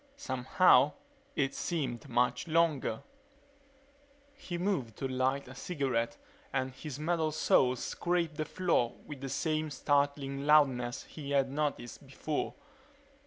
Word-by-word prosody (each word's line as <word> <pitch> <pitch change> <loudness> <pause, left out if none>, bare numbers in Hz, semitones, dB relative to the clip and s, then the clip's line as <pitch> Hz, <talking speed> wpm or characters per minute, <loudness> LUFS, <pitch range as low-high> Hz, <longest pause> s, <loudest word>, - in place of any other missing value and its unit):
Somehow, 130 - +4 0.4
it 135 -1 +1
seemed 135 -9 -3
much 125 +4 +1
longer... 155 -8 +1 1.3
He 240 -11 -6
moved 170 - -1
to 135 - -2
light 130 +1 0
a 130 - -9
cigarette 130 -6 -1 0.3
and 130 -1 -1
his 140 0 -7
metal 160 0 0
soles 130 -4 +3
scraped 170 -3 -1
the 155 - -1
floor 170 -9 +1
with 145 -3 -8
the 135 - -4
same 155 +2 -1
startling 140 0 0
loudness 130 -5 +4
he 145 -3 -9
had 135 -2 +2
noticed 145 -3 -3
before. 145 +3 -3
140 Hz, 120 wpm, -32 LUFS, 130-155 Hz, 1.3 s, Somehow